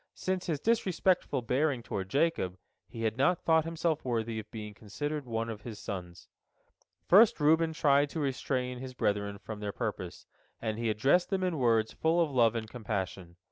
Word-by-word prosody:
Since 185 -1 -2
his 155 -4 -1
disrespectful 185 - +1
bearing 130 +1 0
toward 95 -4 -4
Jacob, 135 - +1 0.3
he 115 +1 -7
had 110 0 0
not 165 +6 +2
thought 160 -1 +4
himself 165 -1 -1
worthy 115 -2 -1
of 110 0 -9
being 105 -2 -7
considered 145 +8 -5
one 115 -1 -2
of 110 -2 -6
his 110 -1 -7
sons. 90 -4 -7 0.8
First 210 +2 +6
Reuben 160 +2 +4
tried 145 -2 +3
to 160 - -4
restrain 125 -2 -2
his 130 0 -8
brethren 100 -2 -1
from 105 +1 -8
their 105 -1 -3
purpose, - - -5 0.3
and 110 -1 -3
he 115 -1 0
addressed 135 +12 +3
them 190 -2 0
in 175 -5 -1
words 115 -3 +2
full 165 +2 +1
of 165 -4 +2
love 120 -3 +3
and 110 -1 -3
compassion. 95 -6 -4
125 Hz, 180 wpm, -30 LUFS, 110-160 Hz, 0.8 s, First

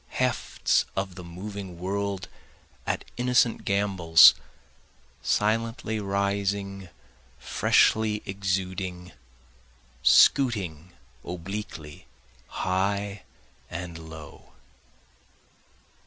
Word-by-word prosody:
Hefts - - +1
of 95 -1 -2
the 90 0 -9
moving 95 +1 -8
world 100 +1 -3 0.6
at - - -2
innocent 125 -1 +2
gambols 95 -5 +6 0.9
silently 110 +1 0
rising 100 -1 -2 0.5
freshly 110 -1 +2
exuding, 95 -2 -3 0.9
Scooting 90 - +3 0.3
obliquely 85 -4 -7 0.4
high 100 +1 -1 0.5
and 85 -1 -7
low. 80 -2 -12
95 Hz, 65 wpm, -26 LUFS, 90-100 Hz, 0.9 s, gambols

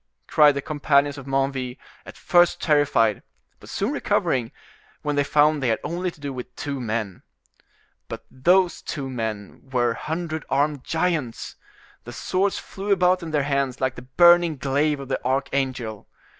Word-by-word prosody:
cried 150 -2 +5
the 140 - -3
companions 145 -1 +1
of 135 - -11
Menneville, 135 -2 -1 0.3
at - - -11
first 175 -1 +3
terrified, 140 -8 +2 0.4
but - - -14
soon - - -1
recovering, 120 -3 0 0.5
when 150 -1 -1
they 145 - +2
found 150 +1 +3
they 130 - 0
had 110 -2 +2
only 175 +4 -2
to 165 - -15
do 140 -1 -5
with 125 -1 -8
two 140 -2 -4
men. 110 -5 -3 0.9
But - - -8
those 175 +6 +2
two 135 -4 -5
men 110 -4 -5
were 120 -2 +1
hundred 160 +2 -4
armed 145 0 0
giants; 160 -8 -2 0.5
the - - -9
swords 195 +2 0
flew 200 +1 -5
about 185 -1 +3
in 165 - -6
their 150 -2 +1
hands 140 -2 -1
like 130 -1 0
the 125 - -10 0.2
burning 175 -2 +6
glaive 140 +2 0
of 135 - -7
the 135 - -3
archangel. 130 -4 -2
140 Hz, 160 wpm, -23 LUFS, 130-160 Hz, 0.9 s, burning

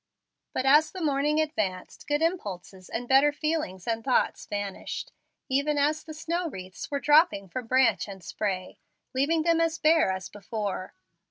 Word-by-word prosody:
But, 260 - -2
as 300 +4 +6
the 370 -3 -6
morning 295 +1 +2
advanced, 215 -13 -2
good 295 +2 +1
impulses 195 - -3
and 245 +2 -4
better 270 +3 +5
feelings 290 - -2
and 225 -1 -1
thoughts 260 - +1
vanished, 205 -2 -4 0.4
even 285 +2 +1
as 300 +2 +1
the 315 -1 -9
snow 335 +2 -2
wreaths 185 -6 -8
were 280 - -1
dropping 295 - +4
from 250 +4 -5
branch 260 -1 +3
and 195 -3 -9
spray, 185 0 -3 0.3
leaving 305 +5 +2
them 330 0 +3
as 330 -1 +1
bare 320 -5 +4
as 190 -1 -4
before. 205 -2 -5
275 Hz, 160 wpm, -27 LUFS, 200-310 Hz, 0.4 s, as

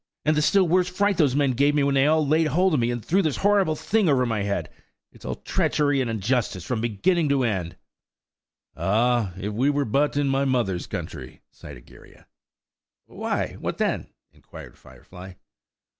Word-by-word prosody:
And 155 0 +2
the 150 - +2
still 190 +4 +3
worse 180 +2 +2
fright 200 +1 0
those 145 -6 +2
men 140 -2 +2
gave 140 +4 +2
me 145 - +2
when 140 0 +1
they 135 +1 +3
all 155 0 +2
laid 155 +2 +2
hold 180 +3 +2
of 150 - +2
me 120 0 0
and 120 -2 -4
threw 190 +4 +2
this 155 -6 -1
horrible 200 -5 +2
thing 210 +3 0
over 130 -3 +2
my 110 -3 -2
head! 100 0 -2 0.4
It's - - -17
all - - -3
treachery 145 -2 0
and 125 - -2
injustice 110 -3 -1
from 120 -4 -2
beginning 145 - 0
to 140 -2 +2
end." 95 -8 -2 1.0
"Ah! 115 0 +1
if 105 +2 -4
we 130 +7 +1
were 145 -1 0
but 145 +6 0
in 145 -1 +1
my 135 0 +1
mother's 120 -10 -1
country!" 80 -6 -7
sighed 70 -3 -12
Egeria. - - -18 0.8
"Why, - - -4
what - - -4
then?" - - -1 0.3
inquired - - -13
Firefly. 90 0 -14
135 Hz, 185 wpm, -24 LUFS, 110-155 Hz, 1.0 s, still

